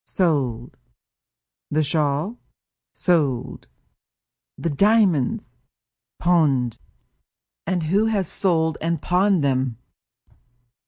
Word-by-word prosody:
"Sold." 135 -10 -1 0.9
"The 155 +1 +1
shawl?" 150 - -1 0.5
"Sold." 145 -9 -1 0.9
"The 165 - -2
diamonds?" 200 - +2 0.6
"Pawned." 145 -9 +1 0.9
"And 180 -2 0
who 195 +8 +2
has 200 -5 0
sold 160 -5 0
and 165 0 -1
pawned 180 0 +2
them?" 130 -4 0
160 Hz, 75 wpm, -22 LUFS, 140-185 Hz, 0.9 s, diamonds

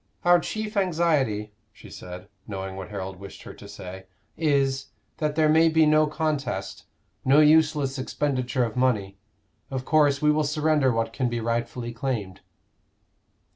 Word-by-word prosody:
"Our 175 0 +6
chief 215 +3 -4
anxiety," 155 - +1 0.2
she - - -15
said, 90 0 -9 0.2
knowing 95 -2 -5
what 95 0 -7
Harold 95 -2 -6
wished 100 0 -11
her - - -9
to - - -13
say, 95 +1 -9 0.3
"is, 135 -3 +1 0.3
that 150 -2 -1
there 155 -1 +3
may 160 +2 +5
be 160 0 +4
no 155 0 +4
contest, 155 -2 -3 0.4
no 135 +3 +5
useless 150 -3 +3
expenditure 130 -2 -1
of 110 - -6
money. 105 -7 0 0.5
Of 130 -1 -4
course 145 -2 +3
we 150 0 +3
will 155 0 +1
surrender 150 -2 +2
what 115 -1 -1
can 130 -3 -1
be 120 0 -2
rightfully 120 +1 -3
claimed." 115 -6 -4
135 Hz, 150 wpm, -25 LUFS, 115-155 Hz, 0.5 s, Our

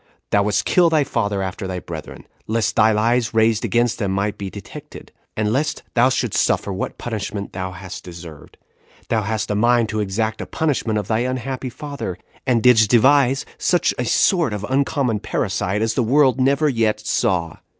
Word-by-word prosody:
Thou 100 - +4
wouldst 105 +1 0
kill 175 -2 +4
thy 155 -2 +3
father 100 -6 -1
after 95 +1 -5
thy 95 -1 -4
brethren, 80 -3 -9 0.2
lest 110 0 0
thy 110 +1 +5
lies 115 +2 +1
raised 110 -1 +3
against 120 0 +1
them 100 -4 -1
might 100 +2 -1
be 100 -1 -6
detected; 100 -1 -11 0.3
and 105 0 0
lest 150 +4 -1
thou 125 +2 +4
shouldst 125 -4 0
suffer 100 - 0
what 95 - -4
punishment 105 -3 -5
thou 95 0 -4
hadst 95 +1 -9
deserved, 85 -3 -11 0.5
thou 110 - +1
hadst 110 +1 -2
a - - 0
mind 120 +1 +3
to 110 - -2
exact 110 +2 -1
that - - -6
punishment 135 -8 -1
of 105 -2 -3
thy 110 0 +1
unhappy 130 +1 -3
father, 140 - -6 0.3
and 120 -3 +2
didst 110 -4 +5
devise 135 +3 +4
such 175 -1 +2
a 125 - 0
sort 165 - +2
of 105 0 -4
uncommon 135 -4 0
parricide 100 +1 -1
as 115 0 0
the 125 - +1
world 130 +2 +3
never 140 +4 +3
yet 110 -5 +1
saw. 90 -6 -1
110 Hz, 180 wpm, -20 LUFS, 100-130 Hz, 0.5 s, thy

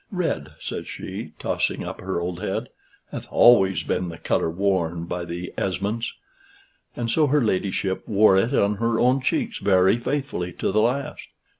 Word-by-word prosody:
"Red," 170 - -2
says - - -5
she, - - -7
tossing - - -1
up - - -6
her 95 -2 -2
old 90 +1 -4
head, 100 -2 -3 0.4
"hath - - -6
always 95 -8 +5
been 90 -1 -1
the 85 - -8
color 80 - 0
worn 85 -2 0
by 90 0 -4
the 85 +1 -6
Esmonds." 100 +5 -2 0.8
And 115 -1 -2
so 155 +3 +3
her 145 0 +3
ladyship 95 -2 -1
wore 105 -2 +5
it 95 +6 +2
on 100 +1 +2
her 115 +1 0
own 125 +2 +3
cheeks 235 - -1
very 95 +2 +4
faithfully 130 - -3
to - - -1
the 110 - +3
last. 140 +6 -1
100 Hz, 165 wpm, -24 LUFS, 90-120 Hz, 0.8 s, always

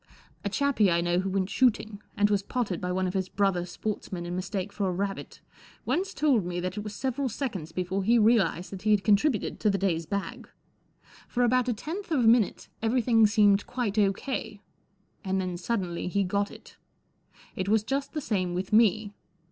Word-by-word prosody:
A 205 - -1
chappie 245 -3 +2
I 170 0 +2
know 175 +1 +1
who 190 +1 -1
went 190 0 -1
shooting, 220 -4 +1 0.2
and 205 0 +3
was 200 -1 +2
potted 200 -4 -3
by 180 - -2
one 185 +1 0
of 180 - -2
his 190 -1 -1
brother 195 -3 0
sportsmen 185 -1 -5
in 175 +1 -4
mistake 190 +2 -4
for 200 -2 -1
a - - -1
rabbit, 195 +2 -4 0.4
once 385 +2 0
told 270 -8 +3
me 175 0 -3
that 185 +1 -3
it 210 - -4
was 210 -1 -7
several 265 +2 -2
seconds 205 - -4
before 185 +3 -2
he 235 +4 +4
realized 215 -5 +2
that 190 -2 -7
he 215 - -1
had 210 -2 +4
contributed 215 +2 +2
to 215 - +2
the 195 - +1
day's 170 -4 -1
bag. 200 -1 -4 0.8
For 245 - 0
about 250 +1 +2
a - - +2
tenth 330 - -6
of 300 -6 +2
a 230 - +3
minute 225 -3 +3
everything 230 -1 +3
seemed 205 -2 +3
quite 230 -4 -1
O.K., 205 +1 -1 0.6
and 190 0 -1
then 180 -1 -2
suddenly 180 -2 -3
he 200 +2 +1
got 200 +2 0
it. - - -14 0.8
It 185 +1 -2
was 215 0 +3
just 275 +4 -3
the 305 - -2
same 185 -8 -1
with 185 +3 -4
me. 215 -1 +3
205 Hz, 195 wpm, -27 LUFS, 185-230 Hz, 0.8 s, he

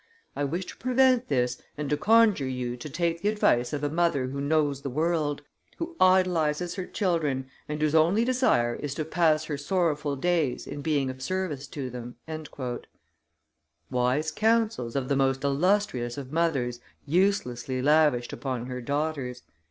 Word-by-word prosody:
I 145 - -1
wish 175 +7 -2
to - - -10
prevent 255 0 +3
this 125 -3 0 0.2
and 150 -1 -3
to - - +4
conjure 210 -4 +4
you 125 -2 -3
to 125 +5 -8
take 170 +2 -1
the 205 - +2
advice 125 - +2
of 145 -1 -3
a 145 - +1
mother 165 -5 +1
who 140 +1 -4
knows 145 -1 +1
the 140 - -4
world, 150 0 0 0.3
who 335 0 -5
idolizes 180 -3 +3
her 185 -1 -5
children, 155 -9 0 0.2
and 150 0 -3
whose 155 0 +1
only 170 +8 +4
desire 245 - +2
is 140 +2 -5
to 155 - -2
pass 160 -1 +2
her 145 -2 -4
sorrowful 150 -3 0
days 160 -3 0
in 145 - -6
being 140 -4 0
of 130 0 -12
service 155 -4 -3
to 135 -3 -5
them." 120 0 -7 1.8
Wise 125 +6 +1
counsels 220 - +1
of 135 -2 -1
the 140 - +1
most 135 0 +1
illustrious 140 -4 +1
of 135 -2 -7
mothers 140 -7 0 0.3
uselessly 140 -7 0
lavished 145 -3 +3
upon 130 -3 -3
her 125 0 -5
daughters! 140 -2 -2
150 Hz, 160 wpm, -27 LUFS, 130-175 Hz, 1.8 s, to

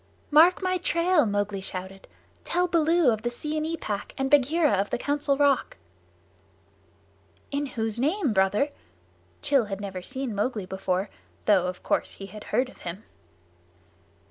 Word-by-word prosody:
"Mark 335 +5 +6
my 370 0 +1
trail!" 340 -6 +2
Mowgli 205 -1 -1
shouted. 190 0 -7 0.4
"Tell 355 +1 +1
Baloo 330 -4 +3
of 220 -1 -2
the 240 - -1
Seeonee 310 +6 -3
Pack 205 -7 -5
and 270 0 -1
Bagheera 295 +3 +4
of 200 +1 +1
the - - -1
Council 285 +1 0
Rock." 285 -1 +2 1.7
"In 285 0 -1
whose 225 -3 -3
name, 300 - +1
Brother?" 200 +8 +2 0.8
Rann 270 -5 +5
had 195 -1 -4
never 195 -2 -5
seen 260 +4 -4
Mowgli 210 0 -1
before, 190 +1 -2 0.3
though 190 -4 +4
of 180 0 -6
course - - 0
he 195 - -8
had 210 +1 -10
heard 255 - +1
of 260 - -16
him. 180 +5 -7
245 Hz, 145 wpm, -26 LUFS, 200-300 Hz, 1.7 s, Mark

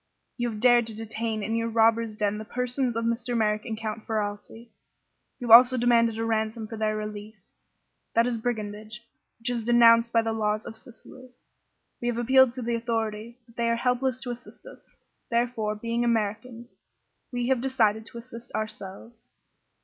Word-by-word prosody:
"You 240 -1 -1
have 215 -2 -6
dared 240 -1 +5
to 220 - -7
detain 220 0 -4
in 225 - -2
your 230 0 -1
robbers' 225 -1 +2
den 210 -1 -1
the - - -5
persons 250 +2 -2
of 230 0 -1
Mr. 235 +1 -1
Merrick 210 -1 0
and 225 -3 -4
Count 220 0 -6
Ferralti. 215 +2 -4 0.7
You 245 - -7
have 230 - +11
also 250 +2 +7
demanded 235 -2 +3
a 225 - -2
ransom 220 0 -1
for 225 - -7
their 215 -1 -1
release. 210 -1 -8 0.6
That 230 +1 +4
is 240 -2 -1
brigandage, 215 -1 -5 0.3
which 235 +2 -2
is 235 -2 -2
denounced 235 0 +5
by 230 -1 +3
the 225 0 -1
laws 215 -1 -1
of - - -8
Sicily. 255 +1 -14 0.7
We 240 - -2
have 240 -1 -1
appealed 260 +1 +4
to 255 -1 -6
the 235 +1 -1
authorities, 230 0 -3
but 230 -1 -22
they 235 0 +1
are 230 - +2
helpless 250 +1 0
to 250 -2 -4
assist 245 - -11
us. - - -12 0.5
Therefore, 235 -3 0
being 230 +2 -2
Americans, 235 +1 -2 0.6
we 245 0 -2
have 260 -3 +2
decided 225 -4 +1
to 235 - -11
assist 235 0 -11
ourselves. 215 +2 -7
230 Hz, 180 wpm, -26 LUFS, 220-240 Hz, 0.7 s, have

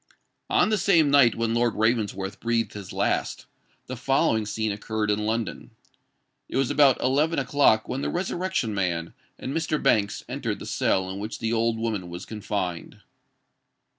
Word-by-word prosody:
On - - +3
the 215 -2 +1
same 165 -7 +4
night 135 -6 +5
when 115 0 -1
Lord 120 -1 +1
Ravensworth 105 -3 0
breathed 115 -2 -1
his 100 -3 -8
last, - - -1 0.4
the 130 - -6
following 125 -3 +1
scene 110 0 -1
occurred 105 +1 -2
in 105 +1 -1
London. 115 -1 -3 0.7
It - - -2
was 135 -2 +1
about 140 -4 +5
eleven 150 +6 +1
o'clock 135 -4 +3
when 130 - -3
the - - -1
Resurrection 175 - -2
Man 85 -4 -2 0.2
and 130 - -5
Mr. 160 -1 0
Banks 105 -1 +1
entered - - -3
the - - -9
cell 95 -1 0
in 95 +1 -5
which 105 +1 -5
the 115 0 -2
old 115 0 +1
woman 110 -6 -3
was 85 +2 -7
confined. 100 -5 -4
115 Hz, 165 wpm, -25 LUFS, 105-135 Hz, 0.7 s, night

